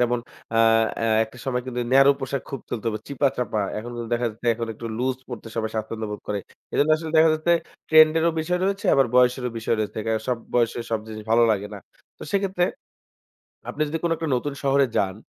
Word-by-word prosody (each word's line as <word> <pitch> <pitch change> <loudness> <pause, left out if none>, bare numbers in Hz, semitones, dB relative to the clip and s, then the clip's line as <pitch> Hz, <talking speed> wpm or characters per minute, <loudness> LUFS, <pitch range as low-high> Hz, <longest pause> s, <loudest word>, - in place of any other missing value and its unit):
যেমন 120 0 +2 0.4
আ - - +4 0.5
আ - - +2 0.2
একটা 110 +2 -15
সময় 125 -2 -1
কিন্তু 125 -1 -3
ন্যারো 135 +1 +7
পোশাক 135 +1 -3
খুব 135 - -5
চলতো। 115 0 -4 0.2
চিপা-চাপা। 130 -6 0 0.2
এখন 120 +3 -7
কিন্তু 115 -1 -5
দেখা 120 0 0
যাচ্ছে 115 +3 -10
এখন 115 0 -4
একটু 115 - -7
লুজ 130 +1 0
পড়তে 120 -2 -7
সবাই 110 -1 -1
স্বছন্দ্যবোধ 110 -1 -4
করে। 105 -1 -1 0.3
এজন্য 150 +2 +2
আসলে 160 0 -6
দেখা 160 0 +6
যাচ্ছে 155 +2 +1 0.4
ট্রেন্ড 155 -1 +7
এরও 170 +1 +3
বিষয় 180 +3 -1
রয়েছে 195 +1 -1
আবার 135 -2 +4
বয়সেরও 125 0 +3
বিষয় 115 0 0
রয়েছে। 110 +1 -3 0.3
আ - - +4 0.2
বয়সে 120 0 +2
সব 110 - +1
জিনিস 110 -1 -7
ভালো 115 +1 +5
লাগে 105 -1 0
না। - - -7 0.4
তো - - -10
সেক্ষেত্রে 195 -3 +1 1.1
আপনি - - -5
যদি 160 - -2
কোনো 170 - +1
একটা 160 - -3
নতুন 140 +3 -2
শহরে 140 0 +4
যান 95 -1 0
125 Hz, 195 wpm, -24 LUFS, 115-145 Hz, 1.1 s, ন্যারো